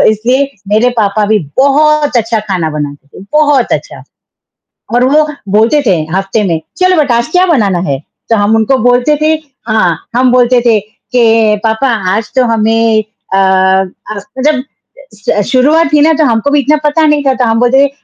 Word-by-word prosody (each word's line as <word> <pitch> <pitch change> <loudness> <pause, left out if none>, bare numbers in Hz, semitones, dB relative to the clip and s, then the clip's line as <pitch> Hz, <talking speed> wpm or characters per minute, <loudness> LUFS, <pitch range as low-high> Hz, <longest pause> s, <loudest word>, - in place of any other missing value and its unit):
इसलिए 250 +6 0 0.2
मेरे 220 +4 +2
पापा 210 0 +1
भी 215 0 +2 0.2
बहुत 295 +1 +2
अच्छा 225 -1 0
खाना 185 -6 -3
बनाते 145 -2 -6
थे, - - -12
बहुत 295 -4 +2
अच्छा। - - -4 0.9
और 245 - +3
वो 305 +1 +2 0.3
बोलते 230 +8 +3
थे 190 -4 +3 0.2
हफ़्ते 195 +2 -1
में 165 -4 -1 0.2
"चलो 370 0 +2
बेटा, 280 -6 +1
आज 235 - -1
क्या 365 +1 +3
बनाना 210 - +1
है?" 135 -1 -2 0.3
तो 225 - +3
हम 205 +2 +1
उनको 225 +4 +1
बोलते 245 +5 +2
थे 310 +1 +2 0.3
हाँ, 200 -6 -1
हम 250 0 +2
बोलते 250 0 +3
थे 225 -3 +3
के, 225 +1 0
"पापा 220 +5 -1 0.3
आज 220 +1 -4
तो 255 - +3
हमें 225 -1 +1 0.3
अ, 195 - +2
आज 190 +1 0
तो" 265 +1 -10
जब 260 -3 -4 0.5
स 205 0 -2
शुरुआत 295 +6 +3
थी 295 - +4
ना, 315 - +4
तो 310 0 +1
हमको 240 +3 0
भी 290 - +3
इतना 290 +3 +2
पता 310 +2 +2
नहीं 295 -1 +1
था, 270 - +2
तो 255 -1 -1
हम 225 0 0
बोलते 265 +3 +3
थे, - - -2
235 Hz, 185 wpm, -10 LUFS, 210-280 Hz, 0.9 s, थी